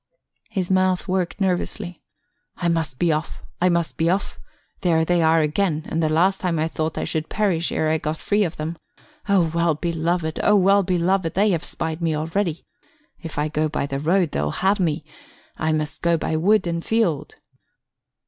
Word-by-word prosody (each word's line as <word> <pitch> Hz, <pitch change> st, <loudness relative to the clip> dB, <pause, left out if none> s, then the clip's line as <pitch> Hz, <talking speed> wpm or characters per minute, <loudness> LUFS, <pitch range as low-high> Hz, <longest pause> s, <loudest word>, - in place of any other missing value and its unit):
His 185 Hz, -2 st, -2 dB
mouth 185 Hz, 0 st, +2 dB
worked 185 Hz, 0 st, -1 dB
nervously. 180 Hz, -1 st, -2 dB, 0.6 s
"I 175 Hz, -, 0 dB
must 160 Hz, -6 st, -1 dB
be 170 Hz, +2 st, +2 dB
off, 155 Hz, +1 st, -3 dB, 0.2 s
I 180 Hz, -, +4 dB
must 170 Hz, -6 st, 0 dB
be 165 Hz, +1 st, +2 dB
off. 195 Hz, +3 st, -1 dB, 0.4 s
There 165 Hz, -5 st, +2 dB
they 175 Hz, 0 st, +2 dB
are 160 Hz, 0 st, +4 dB
again, 155 Hz, +1 st, 0 dB
and 165 Hz, -, -1 dB
the 155 Hz, -, +2 dB
last 185 Hz, +5 st, +2 dB
time 175 Hz, -3 st, 0 dB
I 155 Hz, +1 st, +1 dB
thought 160 Hz, 0 st, -3 dB
I -, -, -1 dB
should 155 Hz, -1 st, -2 dB
perish 185 Hz, -6 st, 0 dB
ere 160 Hz, -, 0 dB
I 160 Hz, 0 st, +1 dB
got 155 Hz, +1 st, -3 dB
free 205 Hz, +5 st, +1 dB
of 170 Hz, -3 st, -3 dB
them. 160 Hz, +2 st, -4 dB, 0.5 s
O 190 Hz, -4 st, +4 dB
well 170 Hz, -2 st, +2 dB
beloved, 165 Hz, 0 st, -1 dB
O 210 Hz, -, +4 dB
well 200 Hz, +1 st, +5 dB
beloved! 180 Hz, -1 st, 0 dB
they 205 Hz, +2 st, +3 dB
have 170 Hz, -2 st, 0 dB
spied 160 Hz, +1 st, -3 dB
me 165 Hz, -2 st, +1 dB
already. 165 Hz, +2 st, -2 dB, 0.6 s
If 165 Hz, -2 st, -8 dB
I 150 Hz, +1 st, +1 dB
go 155 Hz, 0 st, 0 dB
by 145 Hz, -, -1 dB
the 135 Hz, -1 st, -3 dB
road, 170 Hz, +2 st, +2 dB
they'll 75 Hz, +1 st, -1 dB
have 195 Hz, -, +1 dB
me; 160 Hz, -4 st, 0 dB, 0.5 s
I 155 Hz, 0 st, 0 dB
must 155 Hz, -1 st, -2 dB
go 170 Hz, -1 st, +2 dB
by 160 Hz, -, -2 dB
wood 190 Hz, +5 st, +3 dB
and 170 Hz, -1 st, -2 dB
field." 170 Hz, -11 st, 0 dB
170 Hz, 190 wpm, -22 LUFS, 155-185 Hz, 0.6 s, well